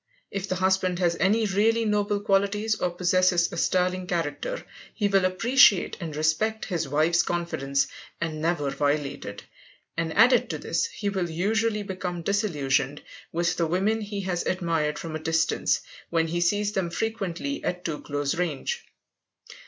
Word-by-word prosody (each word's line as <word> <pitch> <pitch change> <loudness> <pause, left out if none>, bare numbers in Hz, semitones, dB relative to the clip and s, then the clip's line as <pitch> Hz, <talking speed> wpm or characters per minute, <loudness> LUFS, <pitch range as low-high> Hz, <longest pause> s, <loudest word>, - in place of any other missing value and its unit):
If 195 0 -4
the 185 - 0
husband 185 -1 +1
has 175 -2 +2
any 215 +4 +3
really 220 +3 +2
noble 205 -1 +1
qualities 205 +2 +1
or 195 -4 -1
possesses 175 0 +2
a - - -5
sterling 185 +1 +1
character, 175 - -3 0.3
he 205 - +1
will 195 -2 +3
appreciate 205 +1 +4
and 165 -4 -5
respect 160 +9 0
his 170 -6 -2
wife's 160 +4 +3
confidence, 155 -6 -1 0.3
and 155 -2 -3
never 155 -4 0
violate 145 0 -1
it; - - -7 0.5
and 165 -1 -1
added 245 +3 +5
to - - -2
this, - - -1
he 210 - -3
will 190 -3 -2
usually 210 +5 0
become 185 -3 -4
disillusioned 145 - 0 0.3
with 170 +1 0
the 170 - +1
women 200 +6 +1
he 205 -1 -4
has 180 -2 -2
admired 165 -5 0
from 160 -2 -5
a - - -3
distance, 160 +1 +1 0.3
when 165 -1 +1
he 175 +1 -1
sees 205 +4 +1
them 190 -4 -1
frequently 225 +6 -3
at 180 0 -3
too 155 -3 -3
close 145 -1 -2
range. 180 - -2
180 Hz, 160 wpm, -26 LUFS, 165-205 Hz, 0.5 s, added